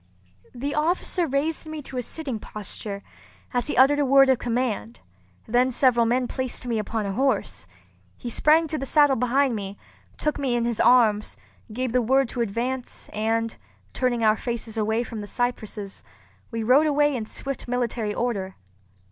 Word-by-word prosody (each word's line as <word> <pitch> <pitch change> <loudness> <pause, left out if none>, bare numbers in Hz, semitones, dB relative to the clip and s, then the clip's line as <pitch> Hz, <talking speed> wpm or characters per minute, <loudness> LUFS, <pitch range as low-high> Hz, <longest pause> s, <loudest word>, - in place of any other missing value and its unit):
The 280 +4 -3
officer 340 +2 0
raised 300 +4 -1
me 310 -1 -6
to 260 - -10
a 250 - 0
sitting 265 -2 -5
posture, 205 -1 -7 0.5
as 245 +1 0
he - - -2
uttered 275 +3 +6
a - - +3
word 270 0 +6
of 260 - +3
command; 230 - -2 0.5
then 245 +3 +3
several 240 -2 +3
men 250 +1 +1
placed 260 -1 -4
me 235 -3 0
upon 215 0 -2
a 195 - -2
horse. 265 +5 0 0.5
He - - -8
sprang 310 +7 +3
to 310 - -2
the 270 - -4
saddle 290 -2 +5
behind 250 +1 +2
me, 200 -1 -5 0.4
took 300 -1 -1
me 265 -4 0
in 235 -1 +1
his 235 -2 -2
arms, 220 -4 +4 0.3
gave 255 +2 -2
the 250 +1 +2
word 265 +2 +2
to 245 - -3
advance; 240 +4 -3
and, 225 +1 0 0.4
turning 245 -3 0
our 215 0 +4
faces 235 -2 -4
away 220 +2 0
from 225 -2 -6
the 205 - -7
cypresses, 215 -4 -3 0.5
we 230 -2 -3
rode 270 +7 +5
away 295 -1 +3
in 220 -3 -4
swift 275 +1 -6
military 235 -3 -1
order. 200 -6 -2
245 Hz, 175 wpm, -25 LUFS, 220-270 Hz, 0.5 s, uttered